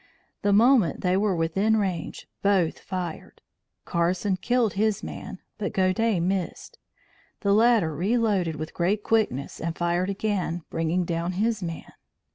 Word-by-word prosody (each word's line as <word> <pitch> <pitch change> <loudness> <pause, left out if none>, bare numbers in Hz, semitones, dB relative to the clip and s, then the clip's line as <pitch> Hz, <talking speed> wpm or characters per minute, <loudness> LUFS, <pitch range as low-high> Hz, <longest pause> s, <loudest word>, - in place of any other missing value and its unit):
The 205 - +2
moment 225 -2 +4
they 180 0 +2
were 200 -1 +1
within 195 +7 +1
range, 185 -6 -3
both 195 -5 +2
fired. 180 -3 -6 0.5
Carson 180 +3 0
killed 235 +3 +1
his 210 0 0
man, 200 -2 -7 0.2
but 205 - -3
Godey 190 +2 +2
missed. 180 +1 -3 0.6
The 200 -1 +2
latter 215 -7 +4
reloaded 195 -3 +1
with 155 +1 -6
great 200 +4 0
quickness 210 - 0
and 165 +1 -3
fired 175 +2 0
again, 195 -4 -2
bringing 165 +2 0
down 170 +1 -2
his 215 +3 0
man. 165 -2 -6
190 Hz, 135 wpm, -25 LUFS, 170-210 Hz, 0.6 s, moment